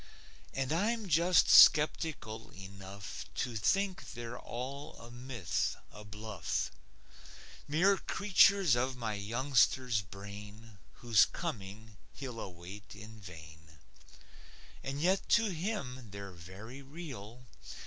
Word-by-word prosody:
And 135 +2 0
I'm 215 +5 0
just 170 +2 +4
skeptical 150 -7 +5
enough 95 0 -8
To 120 -2 -2
think 190 - 0
they're 120 0 -6
all 140 +5 -6
a 115 +1 -12
myth, 120 - -2 0.2
a 105 - -11
bluff; 105 0 -3 1.0
Mere 180 +7 +4
creatures 200 -7 +4
of 130 +1 -1
my 115 -3 -2
youngster's 120 +2 +2
brain, 100 +3 -11 0.3
Whose 115 -4 +6
coming 105 +1 -6 0.2
he'll 125 -4 -7
await 95 +3 -9
in 110 +2 -11
vain. 80 -4 -13 1.0
And 135 +1 -4
yet 190 +5 +1
to 225 -2 0
him 155 - -4
they're 100 0 -8
very 95 +10 -10
real. 130 -6 -9
115 Hz, 105 wpm, -33 LUFS, 100-145 Hz, 1.0 s, Whose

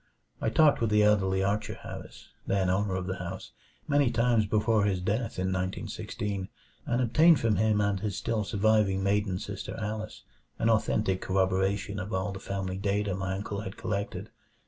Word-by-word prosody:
I - - +1
talked 150 +4 +4
with 115 - +2
the 105 0 +4
elderly 95 -2 +3
Archer 100 +2 -1
Harris, - - -10 0.2
then 95 -2 +2
owner 95 0 0
of 95 -1 -2
the 95 0 -3
house, 90 +1 -6 0.4
many 145 -3 +3
times 115 -2 +2
before 110 0 +2
his 95 -3 +1
death 110 +5 -2
in 95 0 0
1916; 95 +1 -3 0.4
and 120 +1 +1
obtained 155 +7 +5
from 110 -4 +1
him 110 0 +2
and 100 -1 +1
his 100 -1 -3
still 115 -2 -1
surviving 100 -1 +2
maiden 100 -1 +1
sister 100 +1 -6
Alice 110 0 -5 0.3
an 115 - +2
authentic 105 -3 +1
corroboration 95 +2 0
of 105 +2 -5
all 95 +2 -1
the 95 - -7
family 95 -1 -4
data 100 0 0
my 95 0 -2
uncle 100 +1 -4
had 95 -2 -7
collected. 100 -1 -4
100 Hz, 170 wpm, -29 LUFS, 95-110 Hz, 0.4 s, obtained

